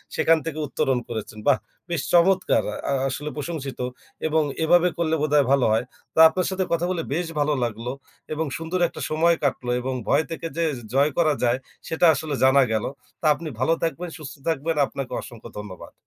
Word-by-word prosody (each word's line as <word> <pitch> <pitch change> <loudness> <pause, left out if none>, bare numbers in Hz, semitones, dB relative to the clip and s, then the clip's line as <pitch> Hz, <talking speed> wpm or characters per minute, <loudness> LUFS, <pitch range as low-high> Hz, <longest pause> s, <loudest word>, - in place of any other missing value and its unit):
সেখান 165 0 +4
থেকে 155 -1 -4
উত্তরণ 130 -1 0
করেছেন। 110 -1 -5
বাহ! 140 - +5 0.3
বেশ 170 -4 -1
চমৎকার! 185 +2 +4 0.3
আ - - +1 0.2
আসলে 150 +3 -4
প্রশংসিত 140 -4 -5 0.5
এবং 160 0 +2 0.2
এভাবে 175 +2 +5
করলে 160 -1 +1
বোধহয় 150 -2 +3
ভালো 140 -2 +4
হয়। 115 +3 +2 0.3
তো - - 0
আপনার 180 +3 -1
সাথে 190 0 0
কথা 170 +1 +1
বলে 170 -3 -1
বেশ 170 +1 -1
ভালো 150 +1 +2
লাগলো 115 +1 -3 0.4
এবং 160 +1 -1
সুন্দর 165 +3 -3
একটা - - -9
সময় 165 +2 +3
কাটলো 125 -3 0
এবং 130 +1 -2
ভয় 150 +3 +3
থেকে 165 0 -4
যে 170 - +2 0.3
জয় 140 +2 +3
করা 155 -3 +4
যায়, 120 +1 +3 0.3
সেটা 165 +2 +2
আসলে 150 -2 -3
জানা 135 +1 +6
গেলো। 110 +2 0 0.3
তা - - -5
আপনি 165 -2 -6
ভালো 145 +6 +3
থাকবেন, 170 +1 -2
সুস্থ 150 -3 -8
থাকবেন, 160 +1 0
আপনাকে 135 -2 -6
অসংখ্য 115 -2 -11
ধন্যবাদ। 100 -4 -8
155 Hz, 185 wpm, -24 LUFS, 130-165 Hz, 0.5 s, জানা